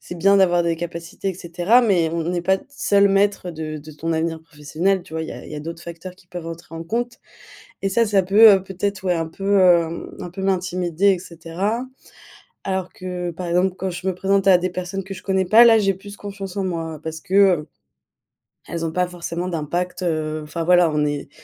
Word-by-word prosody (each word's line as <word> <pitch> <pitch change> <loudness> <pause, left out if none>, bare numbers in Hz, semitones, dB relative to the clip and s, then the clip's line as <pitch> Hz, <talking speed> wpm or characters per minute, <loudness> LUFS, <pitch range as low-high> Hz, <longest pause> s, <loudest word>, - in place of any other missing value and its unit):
c'est 175 - -8
bien 195 +4 +4
d'avoir 175 -2 +4
des 170 -1 0
capacités, 170 +3 -5
et - - -7
cetera, 175 +8 +2
mais 180 -8 +2
on 170 - -2
on 165 - -3
n'est 175 -1 -2
pas 190 +2 +3
d - - -18
seul 200 -7 +3
maître 195 -2 +1
de 155 -2 -5
de 155 +2 -11
ton 165 +3 -3
avenir 160 0 -1
professionnel, 165 +5 -1
tu 160 - -17
vois? 160 - -2
Il 160 - -6
y - - -5
a - - -10
il - - -10
y - - -5
a - - -5
d'autres 165 +2 -7
facteurs 170 +2 -9
qui 185 - -23
peuvent 175 -2 -7
entrer 165 0 -9
en 165 - -5
compte. 240 +6 -3 0.6
Et 195 - 0
ça, 230 +4 +2
ça 200 -2 +2
peut, 210 +4 +7
heu, 190 - +1
peut-être, 195 +1 -3
ouais 180 - +2
un 165 -1 -2
peu, 195 +4 0
hem, 170 -2 +2
un 180 - -6
peu 180 +3 -8
m'intimider, 185 -1 0
et 185 - -3
cetera. 180 +7 -3 0.8
Alors 190 -1 -2
que 180 -1 -5
par 175 +2 -6
exemple 180 +2 +1
quand 190 - -2
je 175 +2 -6
me 185 - 0
présente 195 +1 +1
à 190 -2 +7
des 180 +1 -2
personnes 185 +2 -4
que 195 +1 -7
je 185 - -10
connais 190 -1 +1
pas, 225 +6 +7
là 225 -1 +7
j'ai 195 -2 +2
plus 200 +2 -11
confiance 200 -2 -7
en 195 - 0
moi 165 -4 -4
parce 160 0 -5
que, 190 - -8
heu, 185 -6 +4 1.0
elles 170 -1 -4
ont 160 - -2
pas 180 +1 0
forcément 175 0 -5
d'impact, 175 +3 -3
heu, 155 -2 -1
enfin 165 +2 -4
voilà 175 -2 +5
on 150 0 +1
est 145 -1 -3
180 Hz, 235 wpm, -21 LUFS, 165-195 Hz, 1.0 s, peut